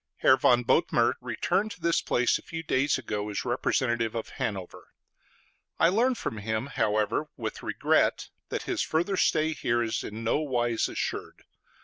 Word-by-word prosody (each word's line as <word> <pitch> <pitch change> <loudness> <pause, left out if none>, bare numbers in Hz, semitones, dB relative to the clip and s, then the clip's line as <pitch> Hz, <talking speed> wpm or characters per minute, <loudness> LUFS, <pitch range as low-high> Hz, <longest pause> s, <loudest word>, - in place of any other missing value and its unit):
Herr 130 - +5
von 125 -2 +3
Bothmer - - +3
returned 210 +2 0
to - - -16
this 170 0 +2
place 125 0 +1
a - - -14
few 165 0 -6
days 140 -2 +1
ago 105 0 -4
as 105 - -3
representative 120 -2 0
of 115 - -4
Hanover; 95 -4 -5 0.9
I 165 - +5
learn 240 +7 +2
from 110 - -4
him, 110 +3 -2
however, 110 +6 +1
with 110 -4 -5
regret, - - +1 0.2
that - - -3
his - - -2
further 175 +5 0
stay 160 -3 +2
here 120 -5 0
is 115 -1 -2
in 110 +2 -6
no 115 - +1
wise 120 -6 0
assured. - - -4
120 Hz, 160 wpm, -28 LUFS, 110-155 Hz, 0.9 s, Herr